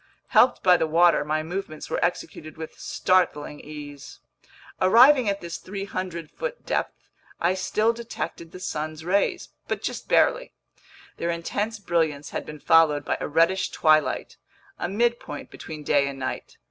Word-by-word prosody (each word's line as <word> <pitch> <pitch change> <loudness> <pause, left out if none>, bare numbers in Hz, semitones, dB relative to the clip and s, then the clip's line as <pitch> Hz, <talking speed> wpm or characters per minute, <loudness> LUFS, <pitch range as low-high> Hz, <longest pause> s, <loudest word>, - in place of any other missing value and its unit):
Helped 255 - +4
by 180 -1 +6
the 160 - 0
water, 170 0 +4
my 155 +1 -1
movements 165 -2 -5
were - - -2
executed 160 -2 -3
with 160 0 -8
startling 165 -5 0
ease. 145 -2 -10 0.6
Arriving 240 +5 +6
at 200 0 -2
this 170 -1 -5
300 185 -4 -5
foot - - -6
depth, - - -3 0.3
I 170 +2 +2
still 215 +4 +1
detected 230 -7 -6
the 185 - -10
sun's 155 -2 -4
rays, 195 +3 0 0.2
but - - -3
just - - -4
barely. - - +3 0.6
Their 170 - -2
intense 205 +6 -2
brilliance 160 -7 -1
had - - -5
been 150 0 -8
followed 160 -3 +4
by - - -1
a - - -2
reddish 165 +5 +2
twilight, 155 -1 +2 0.4
a - - -2
midpoint 235 -7 -1
between 155 -1 -8
day 140 -1 +2
and 140 -1 -5
night. 130 -1 -5
170 Hz, 150 wpm, -25 LUFS, 155-195 Hz, 0.6 s, by